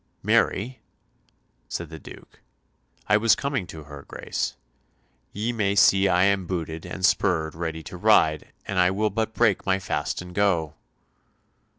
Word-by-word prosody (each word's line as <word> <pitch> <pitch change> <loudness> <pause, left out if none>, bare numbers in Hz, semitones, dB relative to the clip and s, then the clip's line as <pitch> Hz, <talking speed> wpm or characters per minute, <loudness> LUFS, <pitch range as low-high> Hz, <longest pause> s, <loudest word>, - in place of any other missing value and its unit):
"Marry," 125 +6 +1 0.9
said 85 -2 -5
the 80 - -8
Duke, - - -14 0.7
"I 105 - +5
was 115 +1 +4
coming 140 -9 -2
to 80 -1 -9
her 75 -1 -10
Grace. - - -4 0.8
Ye 110 +4 -2
may 100 -3 0
see 95 0 +5
I 90 0 +3
am 100 -2 +2
booted 80 -3 -4
and 95 -1 -2
spurred 80 -5 +1
ready 80 -1 -4
to 90 - -9
ride, 85 -6 +3
and 100 -2 -2
I 90 0 +5
will 105 +3 0
but 110 +1 -2
break 115 -5 +2
my 95 -1 +1
fast 90 -6 -3
and 90 0 -9
go." 90 -6 +1
95 Hz, 155 wpm, -25 LUFS, 80-105 Hz, 0.9 s, I